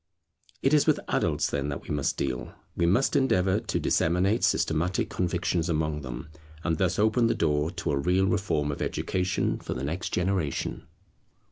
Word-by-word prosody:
It 135 - +3
is 150 - +4
with - - +4
adults, - - +1
then, 70 0 -1
that 70 - -5
we - - -8
must 75 -2 0
deal. 65 -3 -3 0.2
We 85 - +2
must 125 - +2
endeavour 100 -8 +3
to 115 - -2
disseminate 90 +7 +2
systematic 85 +4 +1
convictions 85 -1 0
among 75 -2 0
them, 65 +3 -7 0.3
and 80 -2 0
thus 90 -2 +1
open 110 +3 +3
the - - +1
door 75 -1 +1
to - - -3
a 70 - +1
real 90 +5 +2
reform 80 -7 0
of 70 - -6
education 95 +1 -1
for - - -5
the 65 - -4
next 80 +6 -3
generation. 90 -5 -1
85 Hz, 170 wpm, -27 LUFS, 75-95 Hz, 0.3 s, is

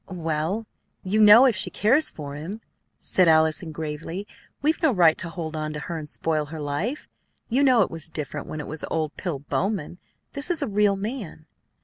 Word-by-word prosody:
"Well, 170 +4 -2 0.4
you 210 +3 +1
know 215 +5 +9
if 250 -5 +3
she - - -1
cares 265 +9 +3
for 145 -2 -8
him," 170 +10 -7 0.4
said 185 -2 +3
Allison 160 +1 +3
gravely, 160 +5 -5 0.4
"we've 310 +3 +1
no 315 -4 +4
right 170 -7 +5
to 170 - -1
hold 165 -2 -5
on 155 0 -3
to 150 - -4
her 165 +4 -5
and 155 -2 -6
spoil 155 -1 -1
her 155 +2 -8
life. 150 - -3 0.4
You 250 +4 +2
know 255 -6 +5
it - - -4
was 165 -1 -5
different 150 -2 -5
when 155 - -6
it - - -7
was 155 +1 -6
old 155 -2 -2
Pill 175 -7 -3
Bowman. 175 +4 -3 0.3
This 280 +4 -3
is 330 -4 +1
a - - -1
real 205 -1 +2
man." 200 - -6
170 Hz, 200 wpm, -24 LUFS, 155-215 Hz, 0.4 s, know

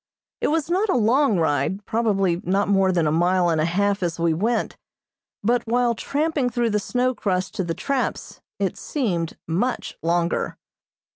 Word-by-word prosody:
It - - +2
was 315 -1 0
not 380 +5 +1
a - - +2
long 240 0 +3
ride, 160 +5 0
probably 195 -6 +1
not 195 +3 +1
more 195 -1 +3
than 170 -3 +1
a 150 - +2
mile 175 +2 +2
and 160 -2 +1
a - - +2
half 200 +4 +1
as 170 -2 -2
we 165 -1 +2
went, 220 +8 -1 0.7
but 240 +3 +2
while 240 +1 +2
tramping 285 +2 -1
through 240 -2 0
the 210 - +1
snow 250 +5 0
crust 185 -5 -2
to 190 - 0
the 165 -1 -3
traps 275 -2 -3 0.2
it - - -1
seemed 180 - -2
much 210 +10 -2
longer. 170 +1 0
200 Hz, 170 wpm, -23 LUFS, 175-245 Hz, 0.7 s, long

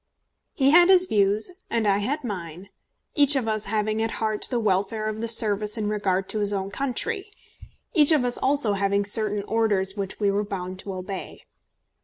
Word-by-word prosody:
He 275 -1 +2
had 350 +3 +6
his 370 -1 +7
views 210 - +1 0.2
and 225 -2 0
I 200 0 +2
had 275 +8 -3
mine, 185 -4 -7 0.4
each 285 -1 +4
of 255 -4 -1
us 215 -1 -2
having 215 +1 -1
at 225 0 -2
heart 215 -1 -2
the 245 - -1
welfare 215 +1 -1
of 215 0 -4
the 230 - -2
service 210 -1 +3
in 210 -1 -2
regard 195 -2 -1
to 215 - -1
his 205 -1 +5
own 195 -1 -3
country, 385 - -2 0.7
each 305 -3 +4
of 295 -5 +3
us 245 - -1
also 265 -6 +2
having 200 0 0
certain 210 0 -1
orders 205 -3 0
which 195 -2 -5
we 205 -2 +1
were 205 +1 -1
bound 185 -2 -6
to 195 - -7
obey. 185 +1 -7
210 Hz, 190 wpm, -24 LUFS, 200-235 Hz, 0.7 s, his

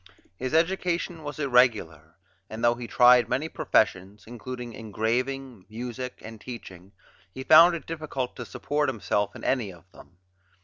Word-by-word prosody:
His 130 - -3
education 170 0 0
was 145 0 -7
irregular, 110 - +1 0.3
and 110 +1 -7
though 120 0 +5
he 120 0 -8
tried 125 0 +5
many 135 +6 -1
professions 100 - 0
including 120 +1 -8
engraving, 115 +2 -3
music, 125 +3 -6
and 110 -1 -10
teaching 95 -6 -10 0.4
he 130 - -6
found 165 +4 +7
it 165 - -8
difficult 155 -6 -5
to 120 - -6
support 145 +8 -1
himself 105 -4 -2
in - - -10
any 120 -7 0
of 85 -3 -16
them. 90 - -17
125 Hz, 145 wpm, -26 LUFS, 110-135 Hz, 0.4 s, found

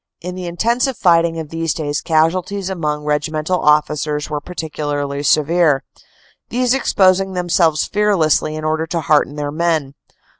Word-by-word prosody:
In 180 +1 -6
the 180 -1 -6
intensive 235 +9 0
fighting 170 -2 +3
of 160 -2 -6
these 165 -2 -2
days 145 -2 -2
casualties 180 +4 0
among 150 -5 -2
regimental 155 +4 -1
officers 150 0 +1
were 150 -1 -2
particularly 145 -4 -4
severe, 155 -1 +2 0.7
these 250 +1 +1
exposing 190 -7 +2
themselves 175 -3 +1
fearlessly 190 -7 +1
in 155 - -6
order 155 +1 -1
to 165 0 -2
hearten 145 -1 +2
their 145 -1 -3
men. 160 -3 -1
160 Hz, 140 wpm, -18 LUFS, 150-180 Hz, 0.7 s, fighting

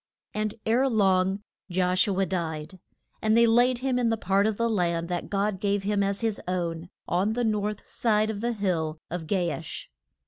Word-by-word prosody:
And 215 0 -2
ere 250 +5 +3
long 195 -3 +2 0.3
Josh 180 +1 +2
u 195 -2 0
a 195 - +3
died. 165 -1 -4 0.4
And 220 +1 +3
they 235 - +7
laid 245 +2 +4
him 255 -2 +1
in 240 -2 +2
the 225 - +1
part 200 0 +2
of 215 -2 -1
the 230 - +1
land 170 -5 0
that 175 -1 -3
God 200 -1 0
gave 200 0 0
him 205 0 +1
as 200 +1 0
his 225 -3 -1
own, 170 -2 -2 0.2
on 190 +5 +1
the 245 +1 -1
north 210 -2 -1
side 215 -1 +1
of 205 -1 -6
the 240 +1 0
hill 170 -7 -1
of 170 -2 -4
Ga 175 -2 +1
ash. 160 - -7
200 Hz, 200 wpm, -27 LUFS, 180-220 Hz, 0.4 s, they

